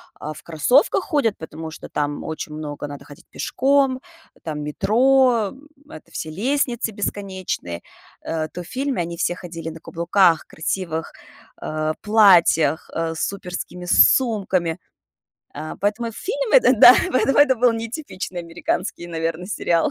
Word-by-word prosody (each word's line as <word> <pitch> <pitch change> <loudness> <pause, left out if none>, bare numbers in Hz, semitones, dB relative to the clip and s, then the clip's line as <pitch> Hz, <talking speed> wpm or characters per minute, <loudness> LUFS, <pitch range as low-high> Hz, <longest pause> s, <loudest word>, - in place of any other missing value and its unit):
а, 155 +1 -6
в - - -13
кроссовках 245 - +2
ходят, 285 - 0
потому 160 0 -8
что 160 - -10
там 145 0 -2
очень 160 -1 -6
много 150 -1 -6
надо 140 -1 -9
ходить 145 -1 -15
пешком, 270 -1 +1 0.4
там 150 -2 -4
метро, 235 - +2 0.4
это - - -12
все 155 - -5
лестницы 240 - -1
бесконечные, 190 - -4 0.4
э, 160 -1 -2
то 180 - -7
в - - -15
фильме 265 -1 -2
они 170 0 -6
все 175 - 0
ходили 165 -2 -7
на 165 - -10
каблуках, 170 0 +2
красивых, 165 0 -4 0.4
а, 155 0 -2
платьях, 175 -8 +4
а, 165 0 -2
с 160 - -1
суперскими 180 -2 -6
сумками. 190 -6 +3 0.8
А. 155 +1 -5
Поэтому 215 +3 -1
фильм - - -3
этот - - +5
да, - - +11 0.2
поэтом - - -8
поэтому 275 +2 +2
это 290 -2 +6
был 240 0 +4
не 230 0 -4
типичный 205 - -6
американский, 175 +1 -4
наверное, 165 +1 -3
сериал. 170 -5 0
180 Hz, 145 wpm, -21 LUFS, 160-230 Hz, 0.8 s, да